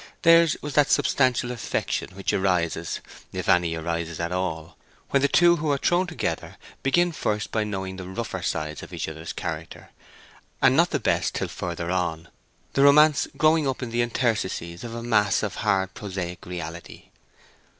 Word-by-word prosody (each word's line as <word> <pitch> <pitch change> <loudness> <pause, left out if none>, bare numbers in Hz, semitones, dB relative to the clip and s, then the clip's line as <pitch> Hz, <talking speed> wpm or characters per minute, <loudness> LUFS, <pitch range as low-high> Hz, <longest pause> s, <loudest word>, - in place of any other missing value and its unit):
Theirs 165 -1 +6
was 145 -1 -4
that 145 -1 +4
substantial 125 -2 +2
affection 115 -5 -3
which 95 - -2
arises 85 -3 0 0.3
(if - - -5
any 85 -2 +3
arises 85 0 -3
at 85 +1 -2
all) 90 -3 -3 0.4
when 140 - +3
the 140 - +4
two 175 +3 +5
who 155 -1 -2
are 140 - +2
thrown 175 +6 +2
together 175 - -4 0.2
begin 175 +6 +2
first 105 -9 -2
by 110 - +1
knowing 95 -3 -4
the 95 -1 -7
rougher 95 -1 -4
sides 75 -4 -3
of - - -11
each - - -3
other's 80 +1 -6
character, - - -6 0.7
and - - +5
not - - +4
the - - -1
best - - 0
till - - -2
further 85 0 -4
on, 85 -3 -2 0.4
the 135 - +2
romance 150 +2 +6
growing 155 -1 +3
up 130 -1 -2
in 120 - -5
the 120 +1 +1
interstices 110 -8 -1
of 115 -1 -6
a 115 - -5
mass 105 -4 +2
of - - -3
hard 95 -1 0
prosaic 90 -4 -6
reality. 85 -1 -7
100 Hz, 170 wpm, -25 LUFS, 85-135 Hz, 0.7 s, Theirs